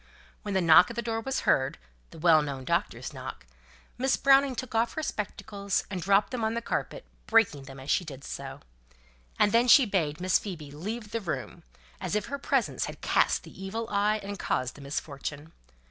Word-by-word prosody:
When 205 -2 -4
the 190 - +3
knock 170 +1 +7
at 235 - -7
the 235 - -2
door 225 0 -2
was 265 +3 -2
heard, 130 +1 +2 0.3
the - - -13
well 160 -1 +5
known 140 -3 -5
doctor's - - -1
knock, - - -8 0.5
Miss 265 +1 +2
Browning 275 -1 +4
took 255 0 -6
off 230 +1 +1
her 315 - -2
spectacles, 205 -4 -3
and 185 -2 -3
dropped 195 +5 +3
them 250 -3 -3
on 220 +1 0
the 235 - -1
carpet, - - -3 0.2
breaking 200 -12 +3
them 135 -1 -10
as 130 +2 -4
she - - +2
did 140 -4 -9
so; - - -7 0.8
and 205 - +4
then 235 +3 +4
she 265 +2 +8
bade 170 -7 -1
Miss 185 +1 +3
Phoebe 160 -8 -7
leave 210 +8 -6
the 230 - -2
room, 175 -6 -5 0.4
as - - -3
if 210 - 0
her 280 0 -4
presence - - 0
had - - -8
cast - - +2
the 190 - -11
evil 225 +4 -4
eye, 210 +1 +2
and 200 0 -6
caused 125 0 -1
the 145 - -13
misfortune. 145 +2 -5
200 Hz, 200 wpm, -28 LUFS, 155-230 Hz, 0.8 s, she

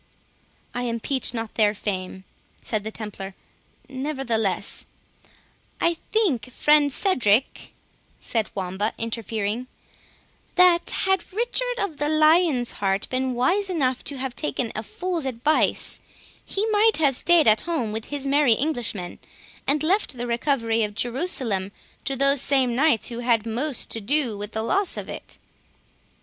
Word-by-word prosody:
"I 245 0 -2
impeach 240 +3 -1
not 225 -2 -4
their 210 -1 +2
fame," 190 -2 -4 0.4
said 215 -2 -1
the 220 - -4
Templar; 200 -3 -7 0.5
"nevertheless— 260 -7 -2 0.4
" - - -33
"I - - -1 0.2
think, 285 - +1
friend 295 +2 +4
Cedric," 255 - +1 0.5
said 225 -3 -2
Wamba, 190 +2 -2
interfering, 225 +1 -3 0.9
"that 360 -2 +5 0.2
had 385 -2 0
Richard - - -1
of 375 -9 -3
the 295 0 -1
Lion's 310 -4 +4
Heart 195 0 -1
been 255 0 -1
wise 380 +11 +2
enough 260 -8 0
to 280 - -4
have 260 -1 -3
taken 260 -6 -2
a 215 - -2
fool's 340 - -3
advice, 265 +5 +1 0.4
he 400 +2 -1
might 435 +1 +4
have 285 -4 +3
staid 340 +1 +4
at 215 0 +5
home 250 -11 -1
with 220 +1 -4
his 285 -1 -4
merry 275 -4 +4
Englishmen, 240 - -3 0.5
and 290 +2 +2
left 360 -5 0
the 240 - -3
recovery 235 -2 0
of 210 -1 -2
Jerusalem 240 - 0 0.3
to 275 - 0
those 275 0 +4
same 265 -4 +2
Knights 275 -4 +2
who 235 -1 -5
had 235 -2 +1
most 245 +5 -1
to 225 - -1
do 255 0 0
with 205 +1 -7
the 220 - -1
loss 390 - +1
of - - -6
it." - - -8
255 Hz, 145 wpm, -24 LUFS, 220-305 Hz, 0.9 s, that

